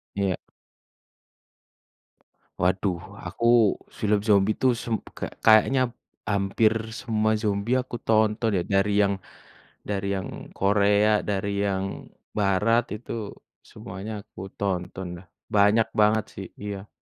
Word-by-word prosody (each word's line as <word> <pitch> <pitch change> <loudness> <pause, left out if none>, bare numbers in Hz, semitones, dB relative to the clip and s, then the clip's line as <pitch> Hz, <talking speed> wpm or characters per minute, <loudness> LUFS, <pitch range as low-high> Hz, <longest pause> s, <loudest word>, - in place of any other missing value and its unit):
Iya. 100 -3 0 2.3
Waduh, 90 -1 0 0.2
aku 115 - -1 0.5
film 105 0 +2
zombie 105 -1 +3
tuh 130 - +3
sum 115 - -1 0.2
ka - - -2 0.2
kayaknya 120 +3 +5 0.4
hampir 100 +2 +2 0.3
semua 110 -2 +1
zombie 105 +4 0
aku 130 -1 -2
tonton 110 -1 +2
ya, 90 - 0
dari 100 +2 +1
yang 100 0 +2 0.8
dari 100 -1 -1
yang 95 - -7
Korea, 105 +1 +3
dari 100 0 -1
yang 95 -1 -3 0.3
Barat, 105 +4 +3
itu 115 - -10 0.5
semuanya 100 +4 -8
aku - - -12 0.2
tonton 95 -1 -3
dah, 95 - -21 0.3
banyak 105 +2 +4
banget 105 +1 +4
sih 95 -1 -7
iya. 100 0 -6
105 Hz, 115 wpm, -25 LUFS, 100-110 Hz, 2.3 s, kayaknya